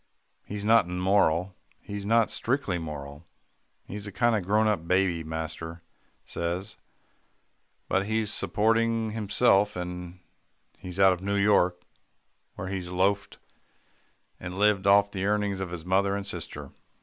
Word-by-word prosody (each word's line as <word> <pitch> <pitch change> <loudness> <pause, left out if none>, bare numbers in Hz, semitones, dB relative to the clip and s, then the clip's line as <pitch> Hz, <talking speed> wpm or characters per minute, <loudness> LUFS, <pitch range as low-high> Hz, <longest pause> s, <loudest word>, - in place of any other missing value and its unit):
He's 105 0 -6
not 115 -2 +5
immoral, 90 -1 +1 0.3
and 100 -1 -5
not 115 0 +3
strictly 120 -8 -1
moral. 75 -1 -7 0.6
He's 105 +1 -7
a - - -6
kind 115 +4 +2
of 105 - -1
grown 105 +4 +2
up 95 -6 -1
baby, 90 -3 +1
master 80 +1 -6 0.4
says, 85 +3 -4 1.1
but 95 +1 0
he's 110 -1 +1
supporting 115 +1 +1
himself, 105 -1 +2
and 90 0 -6 0.6
he's 90 0 -7
out 95 -1 +6
of 90 - -7
New 100 +1 -1
York, 100 -3 +3 0.7
where 95 - -5
he 95 -1 -3
loafed 95 +3 -1 1.0
and 90 +1 -7
lived 100 -1 +2
off 100 0 +5
the 95 -1 -3
earnings 105 -2 0
of 95 -2 -4
his 85 -2 -7
mother 100 +2 +2
and 100 -1 -4
sister. 90 -4 -6
95 Hz, 135 wpm, -27 LUFS, 90-105 Hz, 1.1 s, out